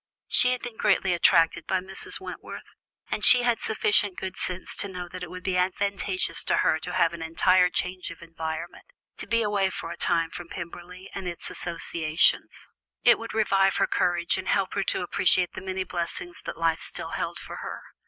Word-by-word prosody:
She 250 Hz, -, +6 dB
had 250 Hz, -, -5 dB
been 240 Hz, -2 st, -6 dB
greatly 190 Hz, -2 st, +2 dB
attracted 165 Hz, -1 st, +3 dB
by 190 Hz, -, +1 dB
Mrs. 190 Hz, +1 st, -4 dB
Wentworth, -, -, -8 dB, 0.5 s
and -, -, -2 dB
she 250 Hz, -1 st, +7 dB
had 240 Hz, -1 st, +2 dB
sufficient 210 Hz, -2 st, +2 dB
good 190 Hz, 0 st, -5 dB
sense 180 Hz, 0 st, -2 dB
to -, -, +1 dB
know 180 Hz, -2 st, -6 dB
that 180 Hz, +1 st, -9 dB
it 180 Hz, -, -6 dB
would 180 Hz, +1 st, -9 dB
be 185 Hz, -1 st, 0 dB
advantageous 185 Hz, -2 st, 0 dB
to -, -, +2 dB
her 160 Hz, -, +3 dB
to 180 Hz, +3 st, -6 dB
have 165 Hz, -, +2 dB
an 170 Hz, -, -7 dB
entire 180 Hz, +3 st, +3 dB
change 180 Hz, +1 st, -3 dB
of 170 Hz, -, -11 dB
environment, 165 Hz, 0 st, -6 dB, 0.3 s
to -, -, -8 dB
be 230 Hz, 0 st, +2 dB
away 205 Hz, -2 st, +1 dB
for 165 Hz, -, -6 dB
a -, -, -7 dB
time 165 Hz, -1 st, +1 dB
from 175 Hz, -1 st, -8 dB
Pemberley, 180 Hz, +1 st, -9 dB
and 195 Hz, -2 st, -5 dB
its 175 Hz, -1 st, -4 dB
associations. 165 Hz, -2 st, 0 dB, 0.4 s
It -, -, +6 dB
would 230 Hz, -1 st, -7 dB
revive 195 Hz, -3 st, +3 dB
her -, -, +3 dB
courage, 175 Hz, 0 st, +1 dB
and 190 Hz, -, -7 dB
help 195 Hz, -2 st, +1 dB
her 200 Hz, -, 0 dB
to -, -, -1 dB
appreciate 180 Hz, 0 st, +3 dB
the -, -, -7 dB
many 190 Hz, 0 st, -3 dB
blessings 175 Hz, 0 st, -4 dB
that -, -, -5 dB
life 165 Hz, -1 st, +1 dB
still -, -, -3 dB
held -, -, -3 dB
for -, -, -8 dB
her. -, -, -7 dB
180 Hz, 200 wpm, -26 LUFS, 170-195 Hz, 0.5 s, she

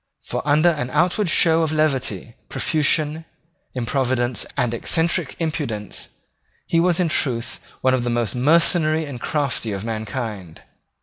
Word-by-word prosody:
For -, -, -3 dB
under 155 Hz, +4 st, +5 dB
an 145 Hz, -7 st, -2 dB
outward 180 Hz, +2 st, +2 dB
show 165 Hz, -1 st, +4 dB
of 160 Hz, -2 st, +1 dB
levity, 135 Hz, -9 st, 0 dB, 0.2 s
profusion, 155 Hz, 0 st, +1 dB, 0.5 s
improvidence, 125 Hz, 0 st, 0 dB
and 125 Hz, -3 st, +1 dB
eccentric 165 Hz, +5 st, 0 dB
impudence, 145 Hz, -, -3 dB, 0.6 s
he 165 Hz, -, +1 dB
was 175 Hz, 0 st, +2 dB
in 180 Hz, -, +2 dB
truth 120 Hz, -6 st, -1 dB, 0.2 s
one 130 Hz, -, +3 dB
of 130 Hz, -2 st, +1 dB
the 120 Hz, -, -1 dB
most 120 Hz, -1 st, 0 dB
mercenary 155 Hz, +3 st, +3 dB
and 130 Hz, -5 st, -8 dB
crafty 140 Hz, -7 st, -1 dB
of 100 Hz, +2 st, -5 dB
mankind. 110 Hz, -5 st, -5 dB
140 Hz, 135 wpm, -21 LUFS, 120-160 Hz, 0.6 s, under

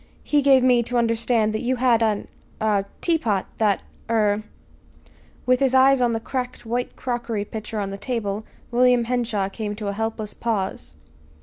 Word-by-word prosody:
He 295 Hz, -1 st, +2 dB
gave 270 Hz, -2 st, +5 dB
me 250 Hz, -2 st, +5 dB
to 240 Hz, +1 st, -2 dB
understand 230 Hz, -1 st, +1 dB
you 245 Hz, +4 st, 0 dB
had 240 Hz, -2 st, +3 dB
an 215 Hz, -2 st, 0 dB, 0.3 s
er 210 Hz, -2 st, +1 dB, 0.2 s
teapot 235 Hz, -, +1 dB
that 210 Hz, -3 st, +2 dB, 0.3 s
er 210 Hz, -2 st, +2 dB, 0.5 s
" 80 Hz, 0 st, -29 dB
With 250 Hz, 0 st, +3 dB
his 265 Hz, -1 st, +2 dB
eyes 265 Hz, 0 st, +5 dB
on 240 Hz, -1 st, +2 dB
the 225 Hz, -, -1 dB
cracked 250 Hz, +1 st, -4 dB
white 240 Hz, +2 st, -2 dB
crockery 235 Hz, -4 st, -3 dB
pitcher 215 Hz, +1 st, -5 dB
on 195 Hz, -1 st, -3 dB
the 195 Hz, -, -6 dB
table, 215 Hz, -4 st, -3 dB, 0.3 s
William 245 Hz, 0 st, +4 dB
Henshaw 230 Hz, -4 st, -1 dB
came 210 Hz, +1 st, -5 dB
to 210 Hz, -1 st, -4 dB
a -, -, -2 dB
helpless 220 Hz, 0 st, -3 dB
pause. 190 Hz, -, -3 dB
225 Hz, 170 wpm, -23 LUFS, 210-250 Hz, 0.5 s, gave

